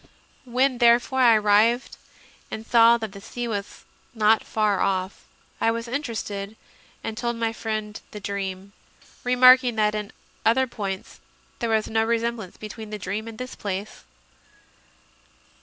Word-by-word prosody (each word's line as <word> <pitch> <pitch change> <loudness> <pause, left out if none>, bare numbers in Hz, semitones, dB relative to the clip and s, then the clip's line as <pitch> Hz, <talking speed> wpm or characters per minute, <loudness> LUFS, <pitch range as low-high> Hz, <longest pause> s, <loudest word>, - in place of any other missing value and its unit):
When, 255 +1 +1
therefore, 240 +2 +4
I 240 -3 +7
arrived 215 +4 +3 0.5
and 220 - -6
saw 235 0 +6
that 220 -3 -5
the 200 0 -11
sea 240 +4 -5
was 205 -3 -5 0.3
not 220 0 +4
far 210 -3 0
off, 190 0 -1 0.4
I 225 - +3
was 230 +1 -2
interested, 220 -6 -4 0.5
and 220 - -4
told 235 +1 -2
my 230 -1 -1
friend 215 -1 -4
the 210 - -8
dream, 195 -1 -5 0.5
re 250 0 +1
marking 255 -1 +7
that 210 -1 +2
in 210 -1 -4 0.3
other 260 +4 +3
points 200 -6 -6 0.4
there 235 - -1
was 220 -1 +1
no 220 0 +1
resem 235 0 0
blance 190 -5 -10
between 215 0 -8
the 210 - -5
dream 205 +3 -4
and 225 -1 -8
this 255 +1 -6
place. 200 +1 -5
220 Hz, 150 wpm, -24 LUFS, 210-235 Hz, 0.5 s, I